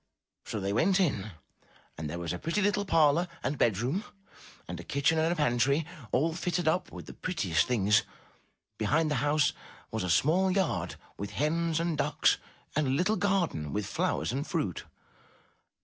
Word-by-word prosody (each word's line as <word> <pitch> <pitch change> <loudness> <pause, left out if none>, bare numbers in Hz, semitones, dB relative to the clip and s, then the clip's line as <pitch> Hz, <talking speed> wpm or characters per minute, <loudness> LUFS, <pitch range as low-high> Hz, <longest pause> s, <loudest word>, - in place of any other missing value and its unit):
So 110 - -3
they 100 0 -1
went 185 - +3
in 115 - 0 0.7
and 75 -1 -5
there 85 - -4
was 85 -1 -3
a 90 - -5
pretty 170 +6 -1
little 205 0 +1
parlor 165 -1 +4 0.2
and 140 +1 -2
bed 110 -6 +3
room, 135 - -1 0.6
and - - -6
a - - -7
kitchen 140 +3 +1
and 160 +1 +2
a - - +1
pantry, 140 +1 +2 0.3
all 160 +6 +2
fitted 175 0 -1
up 175 +4 +1
with - - -9
the - - -9
prettiest 105 - 0
things. 105 -4 +3 0.8
Behind 155 +9 +2
the - - +1
house 145 0 +2 0.4
was - - -2
a 90 - -2
small 160 - +3
yard, 165 - 0 0.2
with 100 - -4
hens 165 +2 +1
and 165 -3 -1
ducks, 150 +2 +2 0.4
and 150 -1 +2
a - - 0
little 180 +11 +2
garden, 180 - 0
with 105 -1 -1
flowers - - -1
and 140 +5 -3
fruit. 150 - -2
150 Hz, 175 wpm, -29 LUFS, 110-170 Hz, 0.8 s, parlor